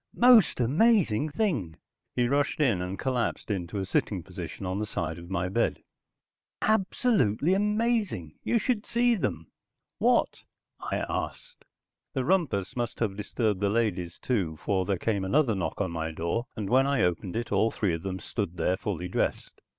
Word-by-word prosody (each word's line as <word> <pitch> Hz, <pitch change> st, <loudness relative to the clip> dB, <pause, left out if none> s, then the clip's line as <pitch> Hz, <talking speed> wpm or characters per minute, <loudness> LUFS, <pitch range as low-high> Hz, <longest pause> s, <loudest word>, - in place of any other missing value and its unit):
"Most 240 Hz, -, +6 dB
amazing 155 Hz, -, +3 dB
thing," 145 Hz, -, -1 dB, 0.4 s
he 120 Hz, -1 st, +2 dB
rushed 140 Hz, +3 st, +1 dB
in 120 Hz, -11 st, +2 dB
and 90 Hz, +2 st, -4 dB
collapsed 125 Hz, -4 st, -1 dB
into 95 Hz, 0 st, -3 dB
a 95 Hz, -, -1 dB
sitting 95 Hz, -1 st, -1 dB
position 90 Hz, 0 st, -7 dB
on 95 Hz, +2 st, -2 dB
the 105 Hz, -, -2 dB
side 85 Hz, -4 st, -3 dB
of 85 Hz, 0 st, -11 dB
my 90 Hz, -1 st, -1 dB
bed. 110 Hz, +6 st, 0 dB, 0.8 s
"Absolutely 190 Hz, -, +2 dB
amazing. 210 Hz, -, 0 dB
You 235 Hz, -, +2 dB
should 230 Hz, -2 st, 0 dB
see 240 Hz, +1 st, +2 dB
them." 80 Hz, -, -3 dB, 0.5 s
"What?" -, -, +2 dB, 0.4 s
I -, -, -2 dB
asked. -, -, -5 dB, 0.5 s
The 130 Hz, -, 0 dB
rumpus 140 Hz, -, +1 dB
must 120 Hz, -2 st, -3 dB
have 105 Hz, -4 st, 0 dB
disturbed 105 Hz, 0 st, -1 dB
the 100 Hz, 0 st, +1 dB
ladies, 100 Hz, -6 st, -1 dB
too, 95 Hz, -11 st, -1 dB
for 95 Hz, -2 st, +1 dB
there 95 Hz, 0 st, 0 dB
came 100 Hz, 0 st, -1 dB
another 125 Hz, +4 st, +2 dB
knock 95 Hz, -4 st, -3 dB
on 95 Hz, -4 st, -1 dB
my 80 Hz, -1 st, -2 dB
door, 85 Hz, +9 st, -2 dB
and 105 Hz, -4 st, -3 dB
when 130 Hz, +5 st, +4 dB
I 140 Hz, -5 st, +2 dB
opened 90 Hz, +1 st, -1 dB
it 115 Hz, 0 st, -3 dB
all 105 Hz, +3 st, +3 dB
three 100 Hz, -5 st, -1 dB
of 80 Hz, -, -3 dB
them 95 Hz, 0 st, -3 dB
stood 95 Hz, -2 st, -4 dB
there 90 Hz, -, +1 dB
fully 90 Hz, -4 st, -3 dB
dressed. -, -, -2 dB
105 Hz, 170 wpm, -28 LUFS, 90-145 Hz, 0.8 s, Most